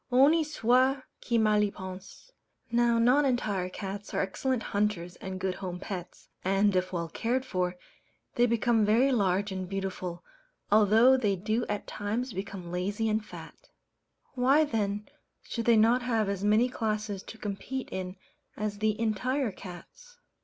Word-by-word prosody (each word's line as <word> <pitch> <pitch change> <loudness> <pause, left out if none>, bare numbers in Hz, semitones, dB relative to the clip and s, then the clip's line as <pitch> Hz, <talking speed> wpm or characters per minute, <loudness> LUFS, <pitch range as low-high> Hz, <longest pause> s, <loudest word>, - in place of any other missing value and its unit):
Honi 280 +6 +5
soit 260 -2 +2 0.2
qui 235 - +1
mal 215 -1 +3
y 210 - +2
pense! 190 - -10 0.4
Now 235 0 +3
"non 250 +5 +4
entire 215 -9 0
cats" 195 +2 -6
are - - +2
excellent 245 +5 -1
hunters 200 -4 -1
and 190 -1 -6
good 190 0 -1
home 185 -2 -5
pets; 180 -2 -7 0.2
and, 195 +1 +2
if 185 0 0
well 170 -2 -2
cared 240 +9 -1
for, 180 -6 -1 0.6
they 240 0 +3
become 235 -1 +2
very 230 +6 +4
large 200 -3 +1
and 185 -1 -4
beautiful, 190 -3 -4 0.5
although 220 +5 +6
they 210 -6 +1
do 215 +5 -1
at 210 0 -3
times 220 +4 -3
become 190 -2 -6
lazy 200 +5 -1
and 215 0 0
fat. - - -12 0.6
Why 270 +4 +4
then 210 -6 -2 0.4
should 230 -1 -4
they 235 -1 +5
not 230 +4 +4
have 230 -4 0
as 200 -1 -3
many 215 +4 +4
classes 215 -4 -2
to 225 - -11
compete 215 +6 -4
in 185 0 -4 0.4
as 210 -1 -3
the 215 0 0
"entire" 230 +3 0
cats? 195 - -12
210 Hz, 155 wpm, -29 LUFS, 195-240 Hz, 0.6 s, although